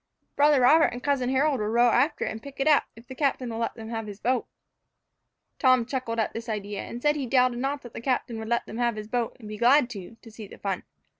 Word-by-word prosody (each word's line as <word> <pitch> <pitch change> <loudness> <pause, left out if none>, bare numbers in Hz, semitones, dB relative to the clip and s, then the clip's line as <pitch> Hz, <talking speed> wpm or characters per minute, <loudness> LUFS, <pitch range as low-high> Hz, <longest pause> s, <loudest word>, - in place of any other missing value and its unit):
"Brother 290 -2 +4
Robert 315 +6 +6
and 245 - -7
cousin 275 -3 +1
Harold 270 +1 +2
will 210 - -1
row 240 +2 +4
after 260 +7 +2
it - - -2
and 220 0 -7
pick 275 +1 -11
it 270 - +1
up, 300 -2 +5
if 230 +2 -15
the 260 - -9
captain 260 -3 -1
will 225 - -4
let 230 - -2
them 225 -1 -9
have 225 -2 -4
his 205 -1 -8
boat." 250 +2 0 1.1
Tom 255 -3 +4
chuckled 250 -2 -3
at 220 - 0
the 230 0 -5
idea, 205 -1 -4
and 235 - -7
said 295 +3 +2
he 275 -4 -3
doubted 250 -1 +2
not 275 +2 -2
the 240 -2 -9
captain 240 -2 -1
would 220 0 -6
let 235 0 0
them 225 - -7
have 240 -2 +1
his 210 0 -7
boat, 235 0 -2
and 220 - -10
be 210 0 -6
glad, 245 +1 +4
too, 205 0 -9
to 225 - -12
see 215 -1 -10
the - - -13
fun. 195 -2 -3
240 Hz, 255 wpm, -26 LUFS, 225-265 Hz, 1.1 s, Robert